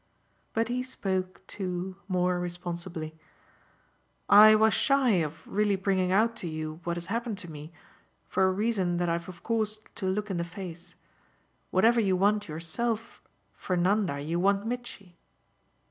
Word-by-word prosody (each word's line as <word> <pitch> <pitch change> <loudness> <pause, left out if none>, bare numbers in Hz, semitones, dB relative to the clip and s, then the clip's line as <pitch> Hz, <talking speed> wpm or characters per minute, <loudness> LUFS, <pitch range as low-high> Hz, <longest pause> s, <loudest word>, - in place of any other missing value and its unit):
'" - - -41
But 225 0 +2
he 250 +1 0
spoke 190 -7 -3
too 185 -1 -4
more 180 -1 +1
responsibly. 175 -2 -5 1.1
"I 215 +1 +9
was 220 0 +4
shy 275 -3 +3
of 160 +1 -7
really 205 0 +1
bringing 190 -1 +1
out 225 +4 +3
to 175 - -2
you 155 0 -5
what 170 0 -1
has 170 - -5
happened 230 +2 -3
to 175 -4 -7
me, 150 +1 -9 0.6
for 190 - +2
a 190 - +3
reason 190 -3 0
that 175 0 0
I've 170 +1 -2
of 175 -2 -11
course 215 -2 0 0.2
to 190 - -4
look 205 +2 -1
in 185 - -1
the 170 - 0
face. 175 -1 -8 0.7
Whatever 230 +6 +4
you 190 -3 +2
want 205 +3 +2
yourself, 210 +9 -3 0.3
for 180 - -2
Nanda 180 -4 +1
you 160 +4 -2
want 200 +2 +2
Mitchy." 225 -7 -6
185 Hz, 160 wpm, -28 LUFS, 175-215 Hz, 1.1 s, I